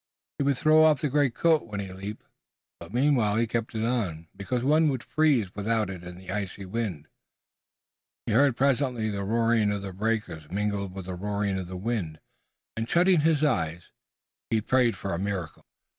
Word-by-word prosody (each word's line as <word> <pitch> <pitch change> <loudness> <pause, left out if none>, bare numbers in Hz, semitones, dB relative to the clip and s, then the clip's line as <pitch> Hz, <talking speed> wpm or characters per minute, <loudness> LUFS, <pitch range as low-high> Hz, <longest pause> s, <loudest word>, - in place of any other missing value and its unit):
He - - +2
would 140 -2 +2
throw 155 +2 +5
off 155 -4 +4
the 150 - 0
greatcoat 145 +2 +2
when 105 -2 -5
he 95 -2 -5
leaped, 100 +3 -7 0.5
but - - -11
meanwhile 120 -4 +2
he 115 +1 +2
kept 115 0 -3
it 110 0 0
on, 90 -10 -2
because 120 +5 -2
one 155 +3 +4
would 130 -4 -2
freeze 140 -12 +2
without 105 0 -1
it 90 -2 -8
in 90 0 -9
the 95 0 -8
icy 100 -1 -4
wind. 95 -7 -4 1.2
He - - -2
heard 140 -4 +4
presently 130 -5 +1
the 100 -1 -3
roaring 115 0 +2
of 100 -1 -3
the 95 -1 -6
breakers 95 -7 -2
mingled 100 -1 -2
with 95 -2 -6
the 95 - -5
roaring 100 +1 -2
of 90 - -5
the 90 0 -6
wind, 95 -7 -3 0.6
and, 115 +1 -3
shutting 180 0 +4
his 155 -1 +2
eyes, 85 - -1 0.6
he 110 - +2
prayed 120 +1 +2
for 100 - -4
a 85 - -2
miracle. 95 -4 -4
110 Hz, 185 wpm, -27 LUFS, 95-130 Hz, 1.2 s, throw